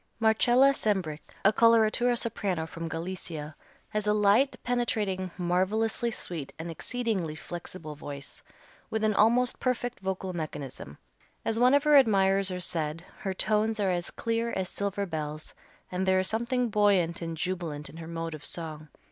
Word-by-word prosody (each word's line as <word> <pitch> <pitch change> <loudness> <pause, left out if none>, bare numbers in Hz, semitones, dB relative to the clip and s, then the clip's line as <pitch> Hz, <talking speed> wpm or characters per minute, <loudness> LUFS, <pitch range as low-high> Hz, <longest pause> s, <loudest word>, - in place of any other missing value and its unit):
Marcella 240 +4 +5
Sembrich, 190 - -1 0.2
a 205 - +6
coloratura 230 +2 +4
soprano 200 -8 -2
from 165 0 -6
Galicia, 165 -3 -5 0.3
has 210 0 -2
a 210 - +4
light, 210 +6 +4
penetrating, 215 -6 0
marvelously 195 +7 +1
sweet, 170 -10 -5
and 165 +1 -5
exceedingly 195 -4 -2
flexible 165 -1 -7
voice, 145 -1 -9 0.5
with 220 0 -1
an 215 0 +3
almost 235 +4 +3
perfect 245 -1 -1
vocal 190 -1 -3
mechanism. 140 - -6 0.5
As 225 0 +1
one 250 +3 +6
of 285 - +3
her 300 -1 +6
admirers 195 -5 +4
has 180 -1 -2
said, 160 +1 -2
her 190 -2 -3
tones 215 +2 +2
are 195 -2 +2
as 175 -1 -1
clear 230 0 -1
as 185 -1 -2
silver 200 0 -2
bells, 155 -3 -5 0.4
and 185 +1 -1
there 190 0 +4
is 185 - +1
something 235 +3 0
buoyant 200 -6 +2
and 165 -1 -4
jubilant 165 -4 -3
in 160 - -12
her 165 -1 -8
mode 165 -1 -4
of 155 -2 -8
song. 155 -2 -4
190 Hz, 155 wpm, -28 LUFS, 165-225 Hz, 0.5 s, a